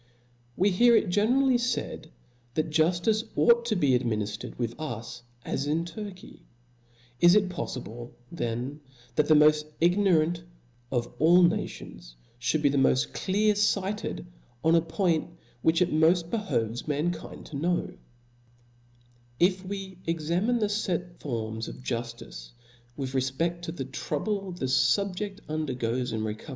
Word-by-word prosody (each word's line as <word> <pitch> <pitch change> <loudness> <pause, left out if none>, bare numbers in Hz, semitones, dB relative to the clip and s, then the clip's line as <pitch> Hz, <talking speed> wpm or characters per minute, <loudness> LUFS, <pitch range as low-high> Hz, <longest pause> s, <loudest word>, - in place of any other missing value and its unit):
\ 120 0 -35
WE 200 +2 +3
hear 235 +5 +5
h 215 - +3
generally 245 +7 +3
faid, 245 0 -3 0.5
that 155 0 0
juftice 175 +7 +2
ought - - +2
Book. 235 - -12
to 230 -2 0
be 145 -8 +2
adminiftercd 110 -4 -1
with 120 -2 -2
us 120 -5 -6 0.2
as 140 - -2
in 160 +3 0
TUrky, 190 +1 -9 0.8
Is^^^^p'*^^ 175 +2 +7
it 200 -3 +3
poilible 120 -8 -6 0.2
then 125 -1 -3 0.4
that 150 - +2
the 155 - +6
moft 150 0 +5
ignorant 175 -2 +3 0.5
of 120 -2 -2
all 175 +4 +6
na 170 - +3
tions - - -11 0.4
(hould 155 -1 0
be 145 - +5
the 140 0 +1
moil: 135 - +4 0.2
clear 210 +3 +2 0.2
lighted 200 - -4 0.4
in 160 - +5
a 165 - +5
point 165 -1 0 0.3
ivhich 160 +2 +3
it 175 - -2
moft 165 +2 +3
behoves 120 - -2
mankind 160 +3 -3
to - - -9
know 170 +5 -1 0.7
\ - - -33 0.7
If 185 +2 +3
we 190 -1 -6
examine 170 +9 0
the 210 -1 0
let 175 -1 -3
forms 110 -4 -4
of - - -7
juftice 115 - -6 0.4
with 135 -2 -4
re 130 - +2
1 130 +1 -2
fpeft 170 +1 0
to 165 - -5
the 160 -6 -5
trouble 190 +9 -3
the 175 -6 -4
fubjeft 195 +10 +1
undergoes 130 -5 -2
in 110 - -2
reco 110 +6 -5
160 Hz, 150 wpm, -27 LUFS, 130-185 Hz, 0.8 s, Is^^^^p'*^^